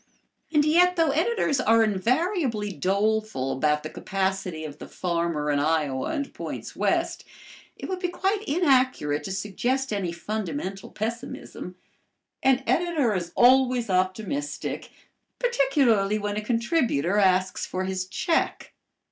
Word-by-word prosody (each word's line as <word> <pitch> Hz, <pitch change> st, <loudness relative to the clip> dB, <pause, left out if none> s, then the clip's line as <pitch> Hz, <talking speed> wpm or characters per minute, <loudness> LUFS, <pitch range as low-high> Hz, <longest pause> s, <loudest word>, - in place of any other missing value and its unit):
And 300 Hz, -2 st, +3 dB
yet 355 Hz, +4 st, +4 dB
though 325 Hz, -4 st, +3 dB
editors 320 Hz, -, +1 dB
are 225 Hz, -1 st, +4 dB
invariably 230 Hz, -, 0 dB
doleful 200 Hz, -7 st, 0 dB
about 150 Hz, +3 st, +1 dB
the 155 Hz, -, -5 dB
capacity 190 Hz, -4 st, -2 dB
of 150 Hz, 0 st, -8 dB
the -, -, -8 dB
farmer 170 Hz, -4 st, -1 dB
in 145 Hz, -, +1 dB
Iowa 145 Hz, -3 st, 0 dB
and 285 Hz, -3 st, -3 dB
points -, -, -6 dB
west, -, -, 0 dB, 0.5 s
it -, -, -6 dB
would 375 Hz, -1 st, -3 dB
be 360 Hz, -, -1 dB
quite 385 Hz, +3 st, -1 dB
inaccurate 260 Hz, -, +2 dB
to 190 Hz, -, -4 dB
suggest 220 Hz, +7 st, -1 dB
any 190 Hz, -4 st, -1 dB
fundamental 195 Hz, -, -4 dB
pessimism. 225 Hz, -4 st, -6 dB, 0.7 s
An 265 Hz, 0 st, +3 dB
editor 325 Hz, -9 st, +1 dB
is 175 Hz, -3 st, -3 dB
always 250 Hz, -3 st, +4 dB
optimistic, 205 Hz, +10 st, -2 dB, 0.5 s
particularly 270 Hz, -, +2 dB
when 205 Hz, -1 st, -3 dB
a 210 Hz, -, -1 dB
contributor 230 Hz, -, +1 dB
asks 185 Hz, -1 st, +2 dB
for 185 Hz, 0 st, -3 dB
his 190 Hz, -1 st, -2 dB
check. 330 Hz, -, -1 dB
215 Hz, 130 wpm, -25 LUFS, 185-275 Hz, 0.7 s, yet